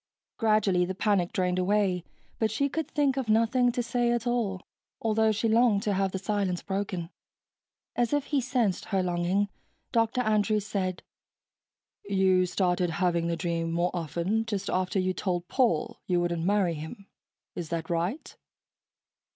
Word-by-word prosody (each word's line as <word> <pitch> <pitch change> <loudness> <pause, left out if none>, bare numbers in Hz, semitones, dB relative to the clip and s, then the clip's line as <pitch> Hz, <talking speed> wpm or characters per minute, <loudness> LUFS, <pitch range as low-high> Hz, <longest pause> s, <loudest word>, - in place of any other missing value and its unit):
Gradually 215 -5 +3
the 185 +1 -3
panic 195 -3 +1
drained 180 -1 0
away, 185 -2 +1 0.4
but 220 - +2
she 280 +7 0
could 320 +3 -3
think 280 -3 +1
of 260 -4 -2
nothing 230 +3 +3
to 245 0 -2
say 240 +1 0
at 240 -1 -1
all, 230 -6 0 0.4
although 220 0 +2
she 220 +2 0
longed 220 -2 +3
to 210 - 0
have 195 0 +1
the 190 - -2
silence 195 -2 -1
broken. 190 -3 -3 0.8
As 240 -1 +1
if 290 -1 +1
he 285 -2 0
sensed 240 -6 0
her 190 -2 0
longing, 180 +3 +1 0.4
Dr. 230 +1 +2
Andrews 215 -2 +1
said, 190 -3 -2 1.0
"You 190 - +3
started 180 -1 +1
having 170 0 0
the 170 0 -1
dream 165 -1 -2
more 175 +2 +1
often 175 +6 -1
just 205 -3 -2
after 185 +1 0
you 185 0 +1
told 180 -2 -2
Paul 235 - +1
you 180 -1 +2
wouldn't 170 -1 -1
marry 195 -3 +2
him, 160 +6 -8 0.5
is 170 -3 -5
that 165 -1 -3
right?" 175 - -2
195 Hz, 160 wpm, -28 LUFS, 180-225 Hz, 1.0 s, Gradually